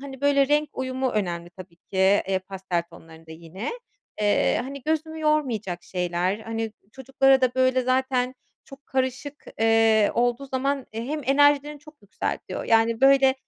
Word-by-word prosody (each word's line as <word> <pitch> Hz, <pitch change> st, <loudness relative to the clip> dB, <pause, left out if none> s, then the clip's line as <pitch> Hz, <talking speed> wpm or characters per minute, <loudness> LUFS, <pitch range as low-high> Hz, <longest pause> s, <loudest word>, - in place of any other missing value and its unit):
hani, 270 Hz, -1 st, -9 dB
böyle, 280 Hz, -1 st, +3 dB
renk 295 Hz, +1 st, +2 dB
uyumu 260 Hz, 0 st, -2 dB
önemli 175 Hz, -5 st, -3 dB
tabii 175 Hz, -1 st, -13 dB
ki, 190 Hz, -, -11 dB, 0.3 s
eee, 190 Hz, -, +1 dB
pastel 185 Hz, -2 st, -4 dB
tonlarında 160 Hz, 0 st, -15 dB
yine. 170 Hz, +6 st, -7 dB, 0.5 s
Eee, 205 Hz, -1 st, +2 dB
hani, 275 Hz, +1 st, -8 dB
gözümü 315 Hz, +2 st, -2 dB
yormayacak 240 Hz, -, -1 dB
şeyler, 180 Hz, +2 st, -2 dB
hani, 225 Hz, 0 st, -4 dB, 0.2 s
çocuklara 270 Hz, 0 st, +2 dB
da, 255 Hz, -1 st, +1 dB
böyle, 260 Hz, 0 st, +2 dB
zaten 255 Hz, 0 st, 0 dB, 0.3 s
çok 275 Hz, +1 st, -15 dB
karışık, 260 Hz, +2 st, -3 dB, 0.2 s
eee, 225 Hz, -1 st, +4 dB
olduğu 245 Hz, +3 st, 0 dB
zaman, 270 Hz, 0 st, -2 dB
eee, 225 Hz, +1 st, -5 dB
hem 300 Hz, +4 st, -3 dB
enerjilerini 290 Hz, +2 st, +3 dB
çok 305 Hz, -3 st, -18 dB
yükseltiyor. 205 Hz, -, -5 dB
Yani, 225 Hz, 0 st, +2 dB
böyle, 270 Hz, 0 st, +5 dB
255 Hz, 145 wpm, -24 LUFS, 205-275 Hz, 0.5 s, böyle